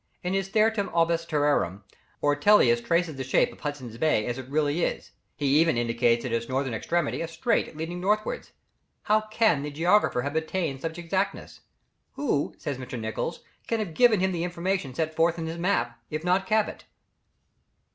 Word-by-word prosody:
In 180 +1 -1
his 195 0 0
Theatrum 215 -1 +2
orbis 165 0 +2
terrarum, 145 - +1 0.4
Ortelius 145 - +4
traces 170 0 0
the 135 - -3
shape 130 - +2
of - - -17
Hudson's 130 -6 -6
Bay 150 -8 +2
as 120 +1 -3
it 130 0 -9
really 150 +3 +1
is; - - -2 0.2
he 145 - -3
even 165 -5 +3
indicates 115 +1 +1
at 125 - -3
its 115 +1 -2
northern 130 -1 -1
extremity 170 +11 -1
a 165 - -2
strait 170 +1 -1
leading 170 +3 -4
northwards. 210 +3 -1 0.5
How 215 +1 +3
can 215 -9 +3
the 145 - -4
geographer 165 -3 +2
have 140 +2 -3
attained 160 -3 -1
to - - -20
such 160 +1 -8
exactness? 185 +3 -3 0.5
"Who," 240 - -1
says 140 -4 -4
Mr. 125 -1 -6
Nicholls, 110 +9 -3 0.3
"can 230 - 0
have 210 -7 -3
given 225 -1 +4
him 190 0 +2
the 170 -2 -2
information 175 -5 -2
set 160 +1 -2
forth 165 +1 +2
in 165 - -3
his 165 +1 -5
map, 180 -9 0
if 155 +1 -4
not 185 +2 +1
Cabot?" 215 0 0
160 Hz, 180 wpm, -26 LUFS, 135-185 Hz, 0.5 s, Ortelius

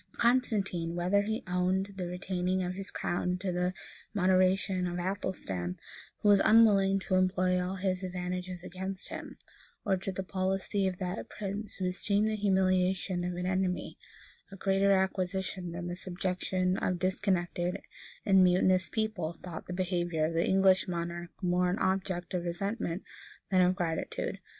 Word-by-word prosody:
Constantine, 205 -9 +1
whether 180 +4 +2
he 220 +4 -2
owed 185 +2 0
the 185 -2 -3
retaining 180 +1 -1
of 180 0 -2
his 195 +1 -5
crown 180 +1 -1
to 185 0 -2
the 180 +1 0 0.4
moderation 185 0 +3
of 175 0 -3
Athelstan, 175 - -3 0.5
who 205 - +5
was 200 -1 +7
unwilling 200 -3 +6
to 190 0 -3
employ 185 -1 +2
all 185 +1 -3
his 185 -1 -1
advantages 180 -1 -4
against 190 +1 -5
him, - - -7 0.5
or 195 -2 +3
to 190 +1 -3
the 190 +1 -4
policy 190 +2 0
of 185 -1 -2
that 185 +1 -4
prince 205 +1 -5
who 185 - -3
esteemed 200 +3 +1
the - - 0
humiliation 185 -2 +1
of 180 0 -2
an 180 0 -3
enemy 185 -1 -1 0.6
a - - -8
greater 195 +1 +2
acquisition 190 -1 0
than 175 +1 -5
the 175 0 -3
subjection 185 0 -1
of 185 - 0
a - - -5
discontented 185 -1 0 0.5
and 190 -2 +6
mutinous 185 0 +3
people 215 -7 -2
thought 170 -1 -8
the - - -6
behavior 175 -3 0
of 165 - -2
the 165 +1 +1
English 190 0 +4
monarch 170 0 -3
more 180 0 +2
an 180 - 0
object 185 -3 -1
of 180 -1 -1
resentment 180 +1 -2 0.5
than 185 -1 +5
of 180 +1 +4
gratitude. 165 -4 -2
185 Hz, 160 wpm, -31 LUFS, 180-195 Hz, 0.6 s, was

